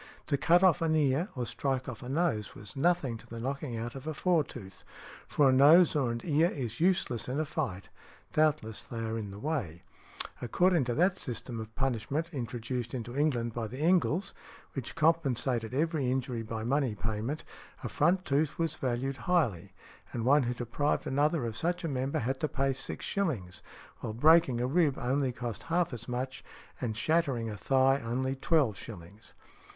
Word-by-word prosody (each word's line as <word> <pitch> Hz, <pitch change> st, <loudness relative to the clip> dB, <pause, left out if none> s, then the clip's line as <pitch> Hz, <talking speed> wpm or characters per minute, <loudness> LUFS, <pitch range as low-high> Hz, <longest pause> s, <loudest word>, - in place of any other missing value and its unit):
To 145 Hz, -, +1 dB
cut 175 Hz, +6 st, +4 dB
off 185 Hz, -2 st, +5 dB
an 160 Hz, -1 st, +2 dB
ear 150 Hz, +5 st, +2 dB
or 125 Hz, -2 st, -2 dB
strike 130 Hz, +3 st, -2 dB
off 125 Hz, -4 st, -6 dB
a 125 Hz, -, -7 dB
nose 140 Hz, -8 st, 0 dB
was 100 Hz, 0 st, -9 dB
nothing 140 Hz, -6 st, +1 dB
to 115 Hz, -, -16 dB
the 115 Hz, 0 st, -7 dB
knocking 135 Hz, 0 st, -3 dB
out 120 Hz, +1 st, -4 dB
of 135 Hz, +2 st, -8 dB
a 155 Hz, -, -3 dB
fore 175 Hz, 0 st, +3 dB
tooth, 95 Hz, -9 st, -11 dB, 0.4 s
for 145 Hz, -, +3 dB
a 130 Hz, -, +5 dB
nose 155 Hz, +7 st, +7 dB
or 135 Hz, -5 st, +1 dB
an 115 Hz, 0 st, -4 dB
ear 160 Hz, +1 st, +3 dB
is 120 Hz, -8 st, -5 dB
useless 160 Hz, -, +1 dB
in 135 Hz, +4 st, -1 dB
a 155 Hz, -, 0 dB
fight—doubtless 140 Hz, -, -2 dB
they 115 Hz, -, -8 dB
are 115 Hz, 0 st, -2 dB
in 110 Hz, -3 st, -4 dB
the 100 Hz, -, -9 dB
way. 110 Hz, -, -3 dB, 0.6 s
According 170 Hz, +5 st, +3 dB
to 120 Hz, -1 st, -1 dB
that 180 Hz, +4 st, +2 dB
system 120 Hz, -3 st, -5 dB
of 110 Hz, 0 st, -8 dB
punishment 135 Hz, +6 st, -1 dB
introduced 120 Hz, -1 st, -4 dB
into 120 Hz, 0 st, -5 dB
England 125 Hz, -6 st, +1 dB
by 115 Hz, -2 st, -3 dB
the 125 Hz, +4 st, -8 dB
Engles, 175 Hz, +4 st, +2 dB, 0.4 s
which 135 Hz, -4 st, -5 dB
compensated 135 Hz, -7 st, +1 dB
every 150 Hz, -1 st, 0 dB
injury 125 Hz, -2 st, -1 dB
by 110 Hz, 0 st, -5 dB
a -, -, -4 dB
money 135 Hz, -3 st, +1 dB
payment, 110 Hz, +7 st, -3 dB, 0.4 s
a -, -, -2 dB
front 180 Hz, +5 st, +2 dB
tooth 140 Hz, +2 st, +1 dB
was 165 Hz, -1 st, 0 dB
valued 130 Hz, +2 st, -1 dB
highly, 115 Hz, -, +1 dB, 0.4 s
and 115 Hz, -1 st, -2 dB
one 145 Hz, +3 st, +5 dB
who 125 Hz, -, -2 dB
deprived 120 Hz, +5 st, -1 dB
another 145 Hz, 0 st, +1 dB
of 115 Hz, -2 st, -4 dB
such 175 Hz, +9 st, -1 dB
a -, -, -1 dB
member 135 Hz, -1 st, -1 dB
had 130 Hz, +3 st, -1 dB
to 155 Hz, -, 0 dB
pay 135 Hz, -1 st, 0 dB
six 130 Hz, -, -5 dB
shillings, 120 Hz, -, -2 dB, 0.4 s
while 110 Hz, -, -4 dB
breaking 150 Hz, 0 st, +5 dB
a 120 Hz, -, +1 dB
rib 145 Hz, 0 st, +2 dB
only 135 Hz, +1 st, 0 dB
cost 120 Hz, -2 st, -5 dB
half 170 Hz, -3 st, +1 dB
as 120 Hz, -1 st, -7 dB
much, 130 Hz, +1 st, -4 dB, 0.4 s
and 110 Hz, -4 st, -2 dB
shattering 135 Hz, -6 st, +1 dB
a -, -, -5 dB
thigh 135 Hz, +4 st, +3 dB
only 130 Hz, +3 st, -1 dB
twelve 135 Hz, -, +2 dB
shillings. 100 Hz, 0 st, -11 dB
130 Hz, 185 wpm, -30 LUFS, 115-155 Hz, 0.6 s, nose